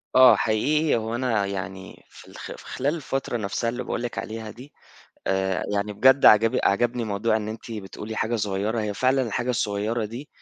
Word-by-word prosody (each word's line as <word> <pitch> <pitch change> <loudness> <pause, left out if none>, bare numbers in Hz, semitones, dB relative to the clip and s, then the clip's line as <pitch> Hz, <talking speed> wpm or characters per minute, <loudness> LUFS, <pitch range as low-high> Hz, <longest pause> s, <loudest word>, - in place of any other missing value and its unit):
آه، 130 -1 +8
حقيقي 145 +8 +1
هو 115 0 -2
أنا 120 -5 0
يعني 95 -1 -6
في، - - -15
في - - -8
خلال 145 +5 -1
الفترة 135 -5 -3
نفسها 110 +3 -2
اللي 125 +1 -4
باقول - - -3
لِك 120 - -5
عليها 110 0 -5
دي 125 +7 -13 0.5
آآ، 95 0 0
يعني 105 +1 -1
بجد 130 +6 +5
عجب 115 +4 +6
عَجَبني 120 +3 +1
موضوع 110 +2 0
إن 105 -1 -4
أنتِ 110 +1 -8
بتقولي 105 +1 -7
حاجة 115 +2 0
صغيّرة، 105 +2 -1
هي 105 -1 -2
فعلًا 130 +4 +2
الحاجة 120 +1 -2
الصغيّرة 110 0 -1
دي 120 +7 -7
110 Hz, 180 wpm, -24 LUFS, 105-125 Hz, 0.5 s, آه